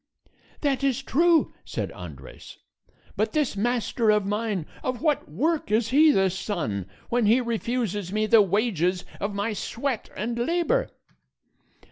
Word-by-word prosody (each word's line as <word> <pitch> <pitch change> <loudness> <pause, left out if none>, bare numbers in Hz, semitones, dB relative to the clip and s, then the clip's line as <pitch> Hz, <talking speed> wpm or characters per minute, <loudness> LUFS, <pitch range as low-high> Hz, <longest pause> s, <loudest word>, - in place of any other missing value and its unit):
"That 275 -3 0
is 270 -1 +1
true," 330 +4 +3
said - - -4
Andres; - - -11 0.6
"but - - 0
this 300 -8 +1
master 235 +1 0
of 210 -2 +3
mine 205 -4 -1 0.2
of 255 -2 -2
what 300 - +1
work 295 - 0
is 220 +1 +2
he 300 +5 +6
the 195 -9 +3
son, 150 - -3 0.2
when 240 -3 +2
he 230 +4 +5
refuses 230 -5 -2
me 215 +1 +1
the 215 +1 +6
wages 190 -3 +1
of 200 0 -3
my 205 +2 -1
sweat 235 +3 -3
and 235 +4 -2
labor?" 350 - +1
230 Hz, 140 wpm, -25 LUFS, 205-270 Hz, 0.6 s, he